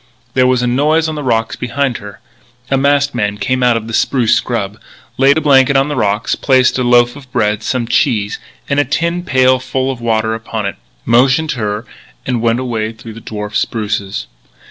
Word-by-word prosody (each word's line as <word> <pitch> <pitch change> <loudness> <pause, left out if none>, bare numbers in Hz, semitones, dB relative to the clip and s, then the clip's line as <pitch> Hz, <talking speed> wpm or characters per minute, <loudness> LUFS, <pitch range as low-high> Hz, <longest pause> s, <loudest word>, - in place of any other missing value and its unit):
There 130 -1 +3
was 125 -1 +2
a - - +1
noise 150 +6 +2
on 160 - -3
the 150 - -4
rocks 115 -4 0
behind 130 0 -2
her. 105 -1 -11 0.5
A - - +4
masked 140 +1 +2
man 105 -4 -1
came 130 +4 -1
out 120 -2 +3
of 110 - -5
the 115 - -7
spruce 120 -1 +2
scrub, 105 -3 -2 0.4
laid 140 +2 +5
a - - +1
blanket 140 -2 +4
on 135 +2 +2
the 145 - -2
rocks, 105 -3 0
placed 130 -1 +2
a - - +1
loaf 120 0 +3
of 135 -3 -13
bread, 105 -1 0
some 120 +1 -2
cheese, 105 -3 0 0.3
and 140 0 +1
a - - +4
tin 170 +6 -1
pail 130 -4 +3
full 130 +1 -2
of 125 -3 -8
water 110 -1 0
upon 110 -1 -4
it, 100 - -4 0.3
motioned 130 +6 +3
her, 105 -3 -3 0.4
and 125 -3 -1
went 115 +1 +1
away 115 -3 -3
through 115 0 -11
the 115 - -11
dwarf 105 -1 -6
spruces. 105 -3 -2
125 Hz, 200 wpm, -15 LUFS, 110-135 Hz, 0.5 s, laid